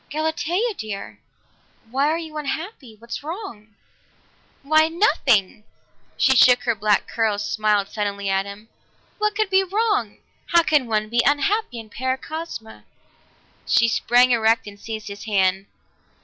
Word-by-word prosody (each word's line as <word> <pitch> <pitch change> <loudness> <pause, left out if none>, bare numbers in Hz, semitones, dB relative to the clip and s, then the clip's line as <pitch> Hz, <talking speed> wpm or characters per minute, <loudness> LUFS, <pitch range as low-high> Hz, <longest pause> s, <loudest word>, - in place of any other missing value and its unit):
"Galatea, 320 +8 -1
dear! 205 -2 -7 0.7
Why 275 +3 +1
are 320 - 0
you 320 -2 -8
unhappy? 300 - -5
What's 235 +2 -7
wrong?" 290 - -8 0.9
"Why, 310 +2 +4
nothing!" 265 - +1 0.5
She 265 - +4
shook 250 0 +6
her 235 - +1
black 210 -1 +1
curls, 210 -2 -1
smiled 210 -2 +1
suddenly 200 -1 -3
at 195 0 0
him. 205 +3 -11 0.5
"What 425 0 0
could 430 -2 0
be 385 0 +4
wrong? 395 - -1 0.4
How 340 0 +6
can 295 -6 +2
one 215 -1 -1
be 235 +1 +2
unhappy 290 - +1
in 220 -2 -12
Paracosma?" 260 0 -5 0.8
She 235 - +4
sprang 245 +2 +3
erect 225 -1 +2
and 205 -1 -11
seized 220 0 -7
his 200 +1 -8
hand. 195 -2 +1
240 Hz, 135 wpm, -22 LUFS, 210-315 Hz, 0.9 s, shook